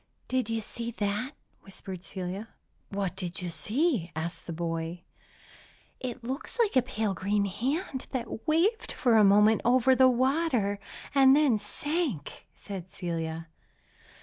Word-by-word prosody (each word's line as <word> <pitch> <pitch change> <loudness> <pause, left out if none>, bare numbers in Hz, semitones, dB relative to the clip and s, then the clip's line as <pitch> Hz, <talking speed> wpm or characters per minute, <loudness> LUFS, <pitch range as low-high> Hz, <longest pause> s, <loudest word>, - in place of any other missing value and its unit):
"Did 255 -3 0
you 225 0 0
see 235 +2 -5
that?" 215 +4 -2 0.3
whispered 190 -2 -9
Celia. 190 +3 -5 0.4
"What 195 -2 -2
did 180 -2 -4
you 175 - -3
see?" 230 - 0
asked 165 +1 -5
the - - -3
boy. 165 +1 -3 1.0
"It 245 -2 -5
looked 265 - -5
like 410 - +3
pale 220 -5 -1
green 200 +2 +1
hand, 260 - -2
that 240 +1 -5
waved 355 +9 +2
for 245 -5 +2
a 215 - +7
moment 210 +2 +6
over 255 +2 +5
the 260 0 +6
water, 255 -5 +1 0.3
and 270 -1 +7
then 280 -7 +4
sank," 265 - -3
said 190 -3 -7
Celia. 165 -2 -4
215 Hz, 135 wpm, -29 LUFS, 185-260 Hz, 1.0 s, a